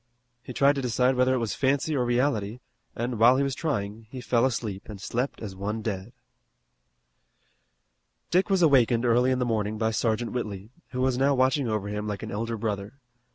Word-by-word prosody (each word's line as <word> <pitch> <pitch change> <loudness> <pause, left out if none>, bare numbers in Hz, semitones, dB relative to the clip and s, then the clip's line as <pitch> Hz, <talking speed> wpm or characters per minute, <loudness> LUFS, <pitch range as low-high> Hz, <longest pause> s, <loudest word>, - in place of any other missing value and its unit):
He 125 - -9
tried 140 +3 +4
to 140 - -3
decide 125 +1 +2
whether 130 +1 +3
it - - +1
was 115 -5 -2
fancy 140 +3 0
or 130 - +1
reality, 120 -3 0 0.4
and, 120 -1 -3
while 120 +3 +6
he 140 - +2
was 140 -1 -1
trying, 110 -9 -3
he 130 - -7
fell 125 0 +2
asleep 110 -6 -4
and 105 -2 -8
slept 125 +7 -3
as 100 -4 -6
one 105 +3 -4
dead. 100 0 -4 2.2
Dick 185 +4 +3
was 190 -3 +3
awakened 125 -5 +4
early 120 +2 +3
in 130 - +2
the 125 - 0
morning 110 -2 -1
by 110 0 0
Sergeant 115 +1 -1
Whitley, 105 -3 -5 0.2
who 125 - -3
was 130 -1 +1
now 140 +1 +3
watching 130 +1 +2
over 105 -2 -2
him 105 +1 -4
like 105 -2 -4
an - - -6
elder 115 +2 -3
brother. 105 -2 -3
120 Hz, 195 wpm, -26 LUFS, 105-130 Hz, 2.2 s, while